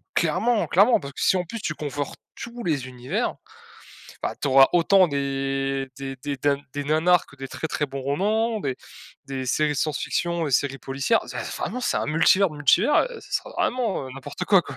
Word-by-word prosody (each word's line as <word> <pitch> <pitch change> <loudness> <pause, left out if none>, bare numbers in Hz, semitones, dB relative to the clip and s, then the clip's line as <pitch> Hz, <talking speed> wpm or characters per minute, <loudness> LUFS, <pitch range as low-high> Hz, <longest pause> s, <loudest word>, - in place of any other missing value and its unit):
Clairement! 235 -2 +2
Clairement! 205 +7 +4
Parce 140 -1 -8
que - - -7
si 190 - +4
en 180 - 0
plus 230 +5 -7
tu 155 - -2
conforts 145 -1 -4 0.2
tous 235 0 -7
les 145 -6 -1
univers, 130 - -3 0.9
bah - - -2
tu - - -1
auras 135 0 +7
autant 185 +2 +5
des 135 -1 -1
des 135 -1 -5
des 140 +2 -4
ding 140 +1 0
des 145 0 -3
nanars 165 +4 +3
que 145 - -17
des 135 -1 -7
très, 160 - -4
très 150 -1 -2
bons 135 0 -6
romans 215 - 0
des 135 -7 -2 0.5
des 135 -1 -5
séries 150 +3 +1
science-fiction 165 +3 -1
et - - -3
séries 135 +1 +1
policières. 135 +12 0 0.4
Vraiment 250 - -3
c'est 245 - 0
un - - 0
multivers, 175 +5 +4
multivers, 150 - +3
heu, 470 - -9
ce - - -15
sera - - -2
vraiment, 235 - 0
heu, - - -9
n'importe 135 +1 -6
quoi, 195 -3 +5
quoi. - - -9
150 Hz, 195 wpm, -24 LUFS, 135-190 Hz, 0.9 s, auras